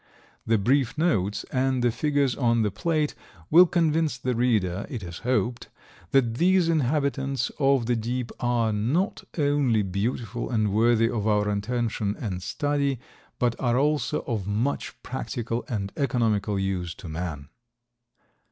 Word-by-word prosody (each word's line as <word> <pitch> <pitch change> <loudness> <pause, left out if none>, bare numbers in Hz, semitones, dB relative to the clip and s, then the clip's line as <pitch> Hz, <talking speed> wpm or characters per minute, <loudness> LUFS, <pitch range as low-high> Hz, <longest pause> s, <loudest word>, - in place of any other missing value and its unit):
The 115 0 +4
brief 125 +5 +1
notes 105 - +1
and 130 -1 +1
the 120 - +3
figures 140 0 +1
on 115 -3 +2
the 105 - 0
plate 150 - 0 0.4
will 180 +3 +8
convince 160 -4 +1
the 125 0 -1
reader, 105 -6 0
it 120 -7 -5
is 85 -1 -7
hoped, 125 -1 -1 0.4
that 120 -4 +2
these 180 -1 +4
inhabitants 140 -2 0
of 135 -4 +3
the 120 +1 +1
deep 120 +2 -3
are 120 -3 +1
not 135 - 0
only 140 -7 +2
beautiful 110 +4 -3
and 110 -4 +1
worthy 115 +1 +4
of 110 -3 -2
our 105 -1 +2
attention 105 0 -1
and 95 -6 -4
study, 140 +4 -1 0.4
but 120 -1 +1
are 120 -1 +1
also 150 +2 +1
of 110 -7 -3
much 110 +7 -2
practical 120 -2 -3
and 100 -5 -3
economical 110 -7 0
use 95 -3 -2
to 90 - -10
man. 80 -3 -5
120 Hz, 145 wpm, -26 LUFS, 105-140 Hz, 0.4 s, will